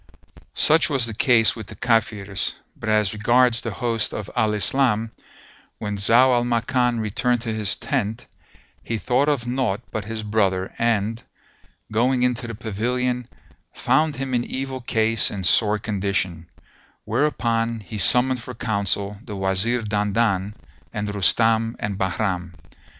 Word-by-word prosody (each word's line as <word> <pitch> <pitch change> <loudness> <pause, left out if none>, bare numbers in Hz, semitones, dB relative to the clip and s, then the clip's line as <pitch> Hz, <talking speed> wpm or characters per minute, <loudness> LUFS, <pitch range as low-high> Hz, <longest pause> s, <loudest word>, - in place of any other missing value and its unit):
Such 160 +1 +5
was 135 -5 +1
the 115 - -4
case 115 -1 +3
with 110 -4 -8
the 110 - -10
Kafirs; 105 -3 0 0.2
but 110 - -6
as 105 -2 +2
regards 120 +2 +3
the 115 - -4
host 115 0 -1
of 105 -2 -6
Al 110 -3 +1
Islam, 115 0 +2 0.7
when 105 -1 -4
Zau 120 +6 +4
al 120 -1 +2
Makan 120 0 0
returned 115 +3 0
to 115 -2 -3
his 105 -2 -1
tent, 115 -4 -3 0.6
he 115 - -3
thought 125 +7 +1
of 140 -5 0
naught 120 -5 -1
but 105 -2 -4
his 110 0 -4
brother 100 -3 0
and, 115 -1 0 0.7
going 125 +3 +2
into 125 -1 0
the 115 - -6
pavilion, 120 +3 -2 0.5
found 155 -1 +1
him 135 0 -4
in 120 -1 +1
evil 130 0 -5
case 115 -2 +1
and 95 -3 -5
sore 105 +5 +4
condition; 95 -5 -2 0.6
whereupon 115 -3 0
he 105 +1 -7
summoned 125 +4 +4
for - - -8
counsel 100 -2 -1
the 105 -5 -7
Wazir 95 +5 0
Dandan 105 -1 0 0.4
and 105 -1 -4
Rustam 115 +3 +2
and 100 -1 -4
Bahram. 90 -2 -2
110 Hz, 145 wpm, -22 LUFS, 105-125 Hz, 0.7 s, Such